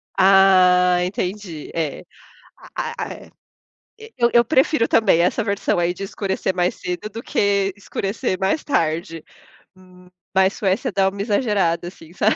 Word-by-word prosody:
Ah, 185 -2 +5
entendi 180 -3 -5
é 160 -4 -3 0.7
a - - -3 0.2
é, - - -13 0.7
e 445 - -11
e 455 - -23
eu 235 -1 +3
eu 235 0 +5
prefiro 260 -1 +2
também 210 -7 +3
essa 200 +7 +1
versão 200 -3 -1
aí 175 0 0
de 195 - -8
escurecer 190 -1 -3
mais 180 0 0
cedo 180 +4 -5
do 225 +2 -8
que 200 -1 0
escurecer 200 0 -3
mais 195 +10 0
tarde, 165 - -2 0.5
hum, 185 -1 -19 0.3
ma 190 0 +4
mas, 190 +2 +1
a - - -11
Suécia 210 +6 -1
dá 195 -1 +2
uma 200 +1 -7
exagerada, 200 -6 0
assim, 165 -2 -13
sabe? 210 +4 +1
195 Hz, 160 wpm, -21 LUFS, 180-210 Hz, 0.7 s, Ah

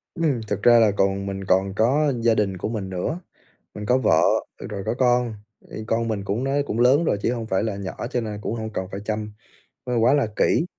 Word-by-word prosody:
Ừm, 155 -8 0
thực 105 0 -3
ra 120 -1 +7
là 110 -2 +5
còn 100 0 0
mình 95 0 -4
còn 95 +1 +1
có 140 +7 +2
gia 115 -1 +3
đình 100 -3 0
của 95 - -3
mình 105 -4 -4
nữa, 95 - -3 0.6
mình 105 - -6
có 125 +4 +3
vợ, 80 -11 +3 0.4
ờ, - - -8
rồi 100 -2 -5
có 110 - 0
con. 125 -2 +2 0.4
Thì - - -7
con 115 0 0
mình 105 -3 -2
cũng 100 +5 -2
nó 135 - -1
cũng 115 - -3
lớn 130 +6 +5
rồi 155 - +1
chứ 120 - +1
hông 115 -2 -4
phải 95 -2 0
là 110 -3 -2
nhỏ, 100 +4 -5
cho 125 - 0
nên 105 -2 -5
cũng 110 - -3
hông 110 -1 -4
cần 95 - -2
phải 100 - -5
chăm 105 0 -3 0.5
nó 125 -1 -1
quá 115 +4 +4
là 145 -5 +2
kỹ. 165 - +2
110 Hz, 245 wpm, -23 LUFS, 100-125 Hz, 0.6 s, ra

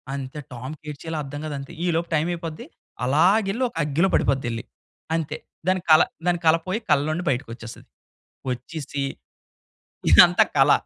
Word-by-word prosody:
అంతే 135 +2 -6
టామ్‌కి 130 +6 -8
ఎటిచేయాలో 160 +2 -6
అర్థం 145 +1 -7
కాదంతే 140 -2 -6
ఈలోపు 170 -1 0
టైమయిపోద్ది. 165 0 -2 0.4
అలాగేళ్లి 195 - +3
ఒక - - -25
అగ్గిలో 150 +6 +2
పడిపోద్దెల్లి. 120 -4 0 0.5
అంతే 155 -1 -2 0.3
దాని 185 -1 +2
కల 155 - +8 0.3
దాని 175 -1 +2
కల 160 +1 +6
పోయి 205 +5 -1
కల్లలో 150 0 +3
నుండి 175 +3 -3
బయటకోచ్చేస్తది. 120 -3 -5 0.6
వచ్చేసి 140 +3 -4 1.1
ఇదంతా - - +8
కల. - - +6
155 Hz, 125 wpm, -24 LUFS, 135-170 Hz, 1.1 s, కల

